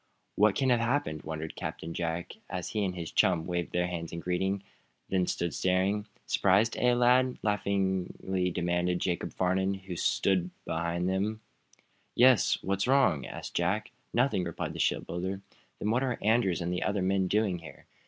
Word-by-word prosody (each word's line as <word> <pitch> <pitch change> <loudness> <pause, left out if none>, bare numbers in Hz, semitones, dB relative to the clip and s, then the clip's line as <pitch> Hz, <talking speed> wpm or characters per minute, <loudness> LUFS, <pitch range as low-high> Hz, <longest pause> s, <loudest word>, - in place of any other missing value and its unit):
"What 105 -1 +4
can 130 -2 +2
have 120 - +4
happened?" 115 - 0
wondered 80 0 -5
Captain 85 +1 -5
Jack, 85 0 -3 0.2
as 90 -1 -4
he 105 -2 -1
and 90 -2 -1
his 85 -2 -5
chum 85 -3 +3
waved 85 -1 -2
their 90 0 +1
hands 85 -2 -4
in 85 - -5
greeting; 95 +3 -1 0.5
then 90 -2 +1
stood 85 -2 -1
staring. 95 +3 +1 0.2
"Surprised, 100 +4 +3
eh, 125 0 +4
lads?" 125 +1 +4
laughingly 95 -2 0
demanded 90 0 0
Jacob 90 -1 -2
Farnum, 95 +1 +1
who 95 -1 -11
had 85 - -5
stolen 95 -3 +2 0.2
up - - -41
behind 85 +2 -1
them. 100 +4 -1 0.7
"Yes; 125 -1 +5
what's 100 +3 0
wrong?" 110 - +3
asked - - -7
Jack. - - 0 0.2
"Nothing," 120 -6 +2
replied 85 -2 -4
the - - -8
shipbuilder. 95 +3 -1 0.4
"Then 105 - -1
what 120 +3 +2
are 130 -3 -1
Andrews 105 -5 +2
and 85 +1 -1
the 90 - -2
other 100 -2 0
men 95 0 +2
doing 100 -3 +1
here?" 85 - -12
95 Hz, 175 wpm, -29 LUFS, 90-105 Hz, 0.7 s, Yes